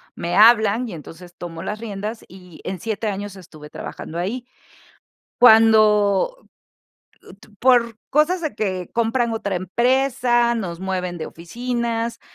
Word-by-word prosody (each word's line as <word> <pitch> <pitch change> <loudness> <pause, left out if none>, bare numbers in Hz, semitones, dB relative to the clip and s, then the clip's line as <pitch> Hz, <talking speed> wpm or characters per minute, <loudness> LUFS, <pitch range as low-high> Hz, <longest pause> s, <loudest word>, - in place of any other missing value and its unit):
me 170 +1 -3
hablan 225 +1 +5
y 210 - -7
entonces 170 +2 -11
tomo 165 -1 -8
las 210 - -5
riendas, 215 0 -6
y 180 -2 -14
en 185 -1 -5
7 220 +2 -3
años 205 -1 -4
estuve 155 -5 -13
trabajando 165 - -8
ahí. 220 +8 -3 0.9
Cuando, 220 - +5 0.9
u - - -14
tu 205 +1 -20
por 235 -1 +3
cosas 305 +6 +2
de 310 -7 -3
que 190 -4 -3
compran 235 +1 0
otra 205 -4 -2
empresa, 240 +4 +1
nos 180 -7 -4
mueven 185 -2 -3
de 160 - -5
oficinas, 235 +5 -4
215 Hz, 135 wpm, -21 LUFS, 185-235 Hz, 0.9 s, hablan